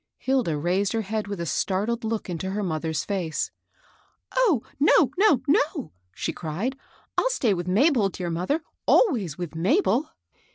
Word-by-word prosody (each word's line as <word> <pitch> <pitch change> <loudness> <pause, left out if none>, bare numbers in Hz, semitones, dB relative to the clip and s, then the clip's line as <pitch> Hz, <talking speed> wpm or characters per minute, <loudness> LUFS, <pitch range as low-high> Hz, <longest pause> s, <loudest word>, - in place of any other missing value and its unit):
Hilda 250 - 0
raised 185 +7 0
her 225 -1 0
head 215 +1 -3
with 200 -2 -5
a 170 - -2
startled 205 +8 -1
look 220 -1 -2
into 180 +1 -3
her 205 +2 -2
mother's 160 -3 -2
face. 180 -6 -2 0.4
" - - -26
Oh, 425 - +3 0.2
no, 295 -1 +5
no, 385 - +4
no 345 - +5
I 285 - -5
" 90 +1 -41
she - - -2
cried; 180 - -3 0.2
'' - - -35
I'll - - +2
stay 245 - +1
with 175 -1 -4
Mabel, 225 - +3
dear 180 -2 -4
mother, 185 - -1
— - - -59
always 215 - +3
with 175 -4 -5
Mabel." 255 - +2
205 Hz, 180 wpm, -25 LUFS, 175-265 Hz, 0.4 s, no